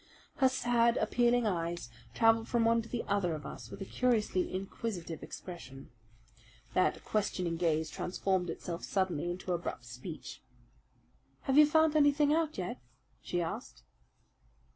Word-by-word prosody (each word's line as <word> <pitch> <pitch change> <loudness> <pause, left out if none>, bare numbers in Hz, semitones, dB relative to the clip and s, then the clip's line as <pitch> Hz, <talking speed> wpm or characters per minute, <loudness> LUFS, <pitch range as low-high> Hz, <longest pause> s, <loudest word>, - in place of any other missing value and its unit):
Her 265 -1 +5
sad, 240 -2 +2
appealing 240 -1 +2
eyes 170 - -2 0.2
travelled 225 0 +4
from 235 -1 +2
one 230 0 +4
to 230 - -11
the 240 - -2
other 180 -5 +1
of 150 -1 -8
us - - -8
with - - -9
a - - -8
curiously 220 -6 +1
inquisitive 185 -3 -4
expression. 135 -8 -9 0.8
That 185 - +1
questioning 185 -5 0
gaze 160 -2 +1
transformed 185 -1 -1
itself 170 +1 -5
suddenly 180 -4 0
into 180 +1 -3
abrupt 170 -8 -4
speech. 125 +8 -8 1.0
"Have 270 - 0
you 300 0 +8
found 315 0 +4
anything 290 0 +4
out 320 -1 0
yet?" 180 -9 -4 0.4
she 175 -1 -1
asked. 165 - -6
190 Hz, 140 wpm, -32 LUFS, 170-240 Hz, 1.0 s, you